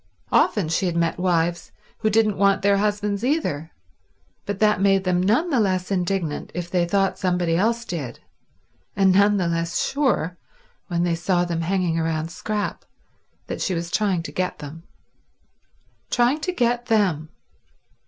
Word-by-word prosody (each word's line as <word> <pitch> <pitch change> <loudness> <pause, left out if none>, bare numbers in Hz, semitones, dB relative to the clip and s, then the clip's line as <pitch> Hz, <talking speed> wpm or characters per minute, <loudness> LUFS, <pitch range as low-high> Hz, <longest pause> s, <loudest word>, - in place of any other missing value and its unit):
Often 190 -7 +2
she 180 +3 0
had 170 - -2
met 170 0 0
wives 175 -1 0 0.3
who 215 - +1
didn't 215 -2 +2
want 200 -1 +3
their 200 0 +4
husbands 205 0 -1
either, 245 - -1 0.8
but 200 -1 -2
that 210 -1 +2
made 195 -1 +3
them 180 -1 +1
none 240 - +2
the 265 - +3
less 185 -3 0
indignant 180 -4 -1
if 175 -1 -4
they 175 -2 +1
thought 195 +2 +1
somebody 180 -3 +1
else 230 +6 +1
did, 140 -9 -5 0.8
and 195 -1 +4
none 200 +2 +4
the 180 -3 0
less 170 0 -1
sure, 245 - 0 0.5
when 170 -1 0
they 175 -1 +1
saw 175 +1 +1
them 170 -1 -2
hanging 175 -1 0
round 160 0 -2
Scrap, 210 +3 -3 0.6
that - - -5
she 185 - 0
was 170 +1 -4
trying 195 -6 +1
to - - -7
get 180 0 -2
them. 150 +3 -9 1.3
Trying 245 +5 +2
to 365 +4 -2
get 245 -6 0
them! 185 -9 +1
185 Hz, 160 wpm, -23 LUFS, 170-210 Hz, 1.3 s, their